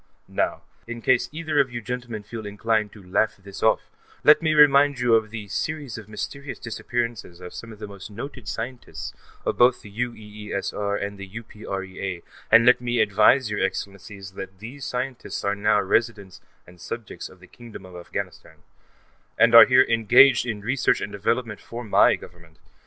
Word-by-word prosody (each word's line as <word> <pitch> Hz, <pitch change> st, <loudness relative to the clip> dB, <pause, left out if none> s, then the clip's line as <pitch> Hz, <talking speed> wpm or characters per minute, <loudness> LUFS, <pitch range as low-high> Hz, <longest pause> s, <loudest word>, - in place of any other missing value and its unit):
_ -, -, -40 dB, 0.2 s
Now, -, -, -2 dB, 0.2 s
in 120 Hz, 0 st, -6 dB
case 130 Hz, -2 st, +2 dB
either 155 Hz, -1 st, -1 dB
of 135 Hz, -3 st, +2 dB
you 120 Hz, -, -4 dB
gentlemen 120 Hz, -1 st, -5 dB
feel 110 Hz, +1 st, -8 dB
inclined 105 Hz, +1 st, 0 dB
to 105 Hz, -, -14 dB
laugh 100 Hz, +4 st, +1 dB
this 100 Hz, 0 st, -11 dB
off, -, -, +2 dB, 0.3 s
let 150 Hz, -, +7 dB
me 155 Hz, -1 st, +1 dB
remind 145 Hz, -1 st, +6 dB
you 120 Hz, -1 st, +2 dB
of 110 Hz, -1 st, +3 dB
the 110 Hz, -2 st, -7 dB
series 145 Hz, +4 st, -4 dB
of 110 Hz, -2 st, -10 dB
mysterious 140 Hz, +6 st, -6 dB
disappearances 115 Hz, -5 st, -4 dB
of 90 Hz, 0 st, -10 dB
some 115 Hz, -, -9 dB
of 110 Hz, -, -11 dB
the 105 Hz, -, -7 dB
most 100 Hz, -1 st, -10 dB
noted 120 Hz, +1 st, -8 dB
scientists 115 Hz, +7 st, -6 dB, 0.3 s
of -, -, -2 dB
both 125 Hz, 0 st, +4 dB
the 105 Hz, -, -12 dB
UEESR 105 Hz, -3 st, -4 dB
and 100 Hz, 0 st, -5 dB
the 100 Hz, -, -7 dB
UPREA, 95 Hz, -4 st, -6 dB, 0.3 s
and 115 Hz, +1 st, +7 dB
let 125 Hz, 0 st, +5 dB
me 120 Hz, -1 st, -1 dB
advise 110 Hz, +3 st, +4 dB
your 105 Hz, -, -2 dB
Excellencies 100 Hz, -1 st, -5 dB
that 95 Hz, 0 st, -9 dB
these 125 Hz, +7 st, -9 dB
scientists 125 Hz, 0 st, -4 dB
are 100 Hz, -, +1 dB
now 105 Hz, +1 st, +2 dB
residents 100 Hz, -2 st, -1 dB, 0.2 s
and 90 Hz, 0 st, -17 dB
subjects 115 Hz, -2 st, -7 dB
of 95 Hz, -, -18 dB
the 90 Hz, -, -15 dB
Kingdom 115 Hz, -1 st, -12 dB
of 90 Hz, -1 st, -13 dB
Afghanistan, 80 Hz, -2 st, -7 dB, 0.7 s
and 115 Hz, 0 st, +5 dB
are 115 Hz, -, +11 dB
here 130 Hz, 0 st, +6 dB
engaged 120 Hz, +4 st, +5 dB
in 110 Hz, -3 st, -3 dB
research 125 Hz, +5 st, +1 dB
and 100 Hz, -, -5 dB
development 115 Hz, +2 st, -2 dB
work -, -, -21 dB
for 120 Hz, +1 st, -6 dB
my 105 Hz, -, +4 dB
Government. 85 Hz, -2 st, -15 dB
110 Hz, 180 wpm, -24 LUFS, 100-120 Hz, 0.7 s, are